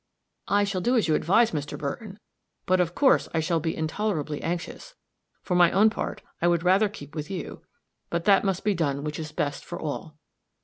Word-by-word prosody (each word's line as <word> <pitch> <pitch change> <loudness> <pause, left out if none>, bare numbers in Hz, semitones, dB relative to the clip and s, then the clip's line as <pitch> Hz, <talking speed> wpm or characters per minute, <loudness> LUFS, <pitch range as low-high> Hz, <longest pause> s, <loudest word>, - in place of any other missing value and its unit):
"I 205 0 +3
shall 200 -2 -1
do 240 +7 +1
just 235 - +4
as - - -1
you - - +4
advise, 210 +10 +3
Mr. 150 -2 -4
Burton; 195 - -5 0.5
but, 185 0 +3
of 175 -1 0
course, 275 -2 +4
I - - +3
shall 165 +1 +1
be 160 +1 -2
intolerably 160 -3 -2
anxious. 175 - -5 0.5
For 180 - -2
my 175 -1 +6
own 215 +3 +5
part, - - -4 0.2
I 170 - +3
would 170 -1 +2
rather 190 +4 +4
keep 145 -7 -11
with 155 +1 -5
you; 190 -3 -6 0.5
but 170 0 -2
that 200 -2 +5
must 195 -2 -1
be 210 - +2
done 140 -5 -1
which 150 0 -4
is 155 -1 -5
best 145 -2 -2
for 175 - -7
all." 155 0 -5
175 Hz, 210 wpm, -26 LUFS, 155-200 Hz, 0.5 s, my